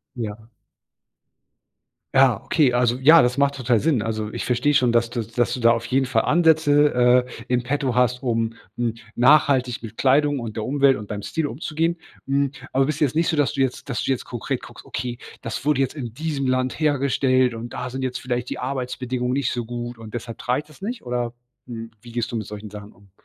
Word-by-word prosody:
Ja. 110 -1 -6 1.7
Ja, 130 -5 +4
okay, 145 -6 +2
also, 120 0 +2
ja, 155 +5 +8
das 125 +2 +2
macht 140 0 +2
total 120 -3 +1
Sinn. 150 -6 +2
Also, 110 0 -3
ich - - -4
verstehe 125 +4 +2
schon, 125 -4 +3
dass 120 0 +2
du 120 - -2
dass 115 +2 -1
du 125 - -3
da 115 0 +6
auf 115 0 -2
jeden 130 +2 +1
Fall 120 -3 +1
Ansätze, 155 -4 +4 0.3
äh, 120 -2 -11
in 125 -1 +1
Petto 130 0 -1
hast, 125 +1 +2
um 115 -2 0 0.2
n 120 -2 0 0.2
nachhaltig 130 -2 +4
mit 115 -1 -9
Kleidung 145 +2 +3
und 115 -2 -6
der 110 - -2
Umwelt 140 +1 +3
und 105 0 -7
beim 105 -1 -5
Stil 160 +7 -2
umzugehen. 165 +5 -2 0.3
Hm, 140 0 +1 0.2
aber 135 0 +3
bist 150 -1 -2
du - - +5
jetzt 135 - -1
nicht 165 +1 +2
so, 160 - +1
dass 145 -1 +2
du 140 - -3
jetzt 130 +1 -1
dass 125 - -1
du - - -1
jetzt 130 - -1
konkret 120 -2 -4
guckst: - - -12
„Okay, 120 -1 -4 0.2
das 115 +4 -5
wurde 145 -2 +3
jetzt 135 - -2
in 120 -6 -6
diesem 145 -1 -2
Land 130 +3 0
hergestellt. 135 -3 +2
Und 115 +1 -7
da 125 - -4
sind 130 +2 -5
jetzt 130 -1 -3
vielleicht 125 -1 -2
die - - -4
Arbeitsbedingungen 125 -1 -2
nicht 135 -3 0
so 120 -2 -3
gut. 120 0 -6
Und 110 0 -11
deshalb 115 -1 -6
trage 125 +3 0
ich - - -14
das 155 +2 -18
nicht“, 230 +4 -5
oder, 120 -1 -2 0.3
hm, 115 -2 -7
wie 120 0 -13
gehst 120 0 -2
du - - -2
mit 110 - -4
solchen 105 0 -8
Sachen 105 0 -10
um? 100 -1 -23
125 Hz, 220 wpm, -23 LUFS, 120-140 Hz, 1.7 s, ja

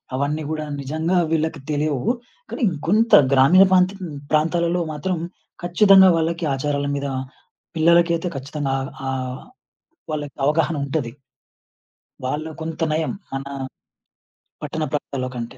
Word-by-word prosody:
అవన్నీ 145 +3 -1
గూడా 155 -1 -3 0.2
నిజంగా 160 +6 -1
వీళ్ళకి 160 -1 0
తెలియవు. 150 - 0 0.4
కానీ - - -6
ఇంకొంత 190 +8 +1 0.2
గ్రామీణ 140 +8 +7
ప్రాంత 185 0 +5 0.4
ప్రాంతాలలో 170 +3 +1
మాత్రం 175 +5 -2 0.5
ఖచ్చితంగా 190 +1 +6
వాళ్ళకి 165 +1 -1
ఆచారాల 140 +1 -1
మీద 140 0 -2 0.7
పిల్లలకైతే 170 +1 +3
ఖచ్చితంగా 140 0 -3
ఆ - - -3 0.3
ఆహ్, 130 -1 -4 0.7
వాళ్ళకి 145 -2 -4
అవగాహన 160 +2 +2
ఉంటది. 135 -4 -2 1.2
వాళ్ళు 155 +4 -3
కొంత 165 0 -2
నయం 155 +1 0 0.2
మన 135 0 -3 1.2
పట్టణ 160 - -3
ప్రాంతాల్లో 135 -3 -3
కంటే. 115 -1 -6
155 Hz, 110 wpm, -22 LUFS, 140-170 Hz, 1.2 s, గ్రామీణ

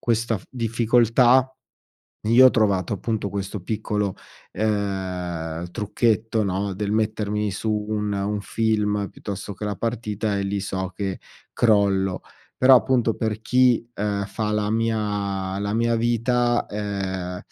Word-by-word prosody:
questa 115 -1 0
f 95 - -13
difficoltà, 120 +2 +3 0.7
io 120 +4 +7
ho - - +7
trovato 100 -5 +1
appunto 105 +1 -2
questo 100 0 -4
piccolo, 105 0 -2 0.4
ehm, 90 -5 -2
trucchetto, 110 +1 0
no, 100 0 -1
del 100 +2 -3
mettermi 105 -1 0
su 110 +3 -3 0.2
un 105 -1 -1
un 100 +1 -1
film, 105 -2 0
piuttosto 100 0 -6
che 105 +2 -6
la 100 -2 -3
partita 110 -2 -2
e 100 - -1
lì 100 0 -2
so 95 -1 -3
che 95 -2 -3 0.3
crollo. 100 -4 +2 0.3
Però 130 0 +7
appunto 120 -3 +2
per 110 -1 -2
chi, 125 -1 +3
ehm, 100 -1 -2
fa 105 +2 -3
la 105 0 0
mia 105 -4 -1
la 100 +1 -2
mia 115 0 +2
vita, 120 +1 +1
ehm, 95 -3 -4
105 Hz, 135 wpm, -23 LUFS, 100-115 Hz, 0.7 s, io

